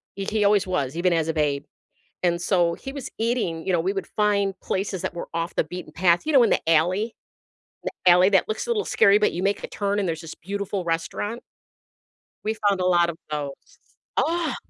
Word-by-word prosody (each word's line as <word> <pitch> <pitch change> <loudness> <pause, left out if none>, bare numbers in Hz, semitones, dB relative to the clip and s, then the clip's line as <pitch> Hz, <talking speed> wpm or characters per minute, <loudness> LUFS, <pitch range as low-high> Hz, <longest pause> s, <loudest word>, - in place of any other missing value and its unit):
He 195 - -4
he 215 +1 0
always 200 -1 +3
was, 145 -6 -1
even 175 +1 +2
as 165 -1 +1
a - - +1
babe. 145 -3 0 0.6
And 170 0 +1
so 175 -2 +2
he 270 - -8
was 275 -2 -6
eating 220 -8 -1
you 190 - 0
know, 175 - +3
we 185 +3 0
would 195 - -4
find 200 -2 +1
places 190 -1 -2
that - - -3
were 170 - -6
off 165 +1 -3
the - - +2
beaten 180 +3 -8
path, 175 - +3
you 315 - 0
know, 265 -3 +7
in 225 - +3
the - - +2
alley? 180 +8 +2 0.7
The 185 - +2
alley 180 +2 +5
that 195 -2 +3
looks 215 - -3
a - - -6
little 440 -3 0
scary, 200 0 +5
but 210 - +2
you 175 - -3
make 200 +1 0
a - - -3
turn 200 0 -1
and 195 - 0
there's 165 -1 -3
this 165 -2 -9
beautiful 200 +1 -4
restaurant? 190 +7 -2 1.0
We 220 +1 -1
found 195 -2 +2
a - - +1
lot 175 -1 +4
of 165 - -6
those. 145 -2 -6 0.4
Ah! 330 -5 +1
190 Hz, 220 wpm, -24 LUFS, 170-210 Hz, 1.0 s, know